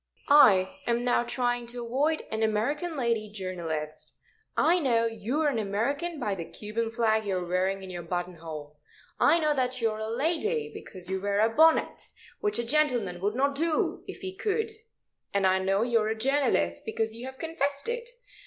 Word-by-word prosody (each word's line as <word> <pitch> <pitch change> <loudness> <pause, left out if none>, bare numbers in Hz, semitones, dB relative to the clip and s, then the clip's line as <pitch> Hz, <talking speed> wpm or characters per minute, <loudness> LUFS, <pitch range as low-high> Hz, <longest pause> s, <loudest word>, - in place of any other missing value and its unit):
"I 195 -10 +6
am 235 0 +1
now 245 -1 +3
trying 245 -1 -1
to 240 0 -4
avoid 290 +7 0
an 220 - -2
American 285 +10 0
lady 230 -4 0
journalist. 170 -6 -5 0.4
I 345 +3 +4
know 235 -7 +2
you 225 +6 -2
are 310 - +3
an 265 -6 +1
American 280 - -1
by 210 -5 -1
the 180 -3 -4
Cuban 215 +6 -4
flag 220 -1 +1
you 195 -3 -1
are 180 - -3
wearing 190 +2 0
in 190 - -7
your 175 -1 -5
button 175 +1 -4
hole. 150 -2 -8 0.4
I 335 - +5
know 305 -2 +2
that 255 -2 -1
you 225 -2 +1
are 215 - -6
a 220 0 -3
lady, 335 - 0
because 185 -2 -10
you 190 0 -2
wear 200 0 0
a 220 +2 +4
bonnet, 320 +1 +4 0.4
which 210 +1 0
a 235 - 0
gentleman 240 -9 +1
would 205 +3 0
not 280 +2 +2
do 315 +2 0
if - - -8
he 380 -1 -5
could. 435 +3 -1 0.6
And 200 -1 +3
I 190 0 +4
know 195 +2 +1
you 235 -1 +2
are 215 - 0
a 220 - -2
journalist, 250 - +1
because 220 0 -2
you 240 +3 -7
have 265 0 -9
confessed 285 - -2
it. 475 0 -3
230 Hz, 195 wpm, -28 LUFS, 195-285 Hz, 0.6 s, I